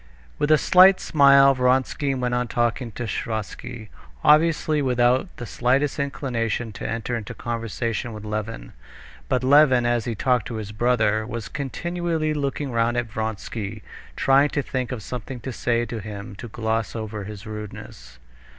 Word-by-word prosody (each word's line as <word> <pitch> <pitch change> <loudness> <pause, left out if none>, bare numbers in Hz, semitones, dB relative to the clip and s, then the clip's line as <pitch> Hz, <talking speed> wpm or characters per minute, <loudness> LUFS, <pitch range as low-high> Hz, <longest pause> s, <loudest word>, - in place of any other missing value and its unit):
With 145 - +1
a 155 - +7
slight 185 +4 +6
smile 140 -2 +6
Vronsky 130 +2 +1
went 125 -1 -1
on 125 0 0
talking 120 +1 -1
to 120 - -5
Sviazhsky, 110 +1 -5 0.3
obviously 155 -1 +4
without 125 +3 +2
the 120 - -6
slightest 130 +6 0
inclination 120 -5 -2
to - - -6
enter 115 +1 -2
into 115 +1 -6
conversation 115 +1 -3
with 105 -1 -8
Levin. 105 - -5 0.6
But 125 - +1
Levin, 130 -2 +5
as 120 -1 +1
he 120 -2 -2
talked 125 0 +1
to 115 - -5
his 105 -2 -5
brother, 110 -1 +1
was 115 -2 -5
continually 165 +2 -2
looking 140 -1 -2
round 115 +1 +1
at 120 -2 -2
Vronsky, 110 -1 -4 0.3
trying 135 +2 +4
to 145 - -1
think 130 -2 -3
of 120 -5 -5
something 125 +3 -6
to 130 - -5
say 120 0 0
to 115 -1 -5
him 100 -1 -7
to 120 - -7
gloss 110 0 -2
over 110 -2 -5
his 105 +1 -9
rudeness. 105 - -9
120 Hz, 160 wpm, -23 LUFS, 110-135 Hz, 0.6 s, a